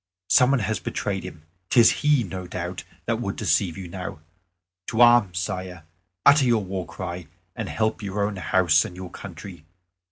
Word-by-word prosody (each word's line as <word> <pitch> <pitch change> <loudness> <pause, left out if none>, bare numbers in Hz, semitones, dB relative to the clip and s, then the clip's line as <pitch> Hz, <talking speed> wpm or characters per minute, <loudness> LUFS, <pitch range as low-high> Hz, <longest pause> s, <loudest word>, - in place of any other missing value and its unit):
Some 125 - +6
one 135 -3 +2
has 105 +2 -1
betrayed 95 -2 -3
him; 90 -4 -10 0.3
'tis 120 -3 +6
he, 145 -4 +3
I - - -7
doubt 90 -1 -7
not, 90 +1 -4 0.2
that - - -1
would - - -3
deceive 90 -4 0
you 95 -2 -7
now. 90 -3 -7 0.7
To 110 - -3
arms, 120 -7 +5
Sire! 90 -2 -4 0.4
utter 140 -1 +6
your 115 -4 +2
war 95 -1 -4
cry, 90 -3 -6 0.3
and 110 -3 -4
help 110 +1 -1
your 100 0 -2
own 100 -1 -4
house 90 -3 +3
and 100 -5 -8
your 90 -1 -8
country. 90 -3 -10
95 Hz, 180 wpm, -24 LUFS, 90-110 Hz, 0.7 s, Some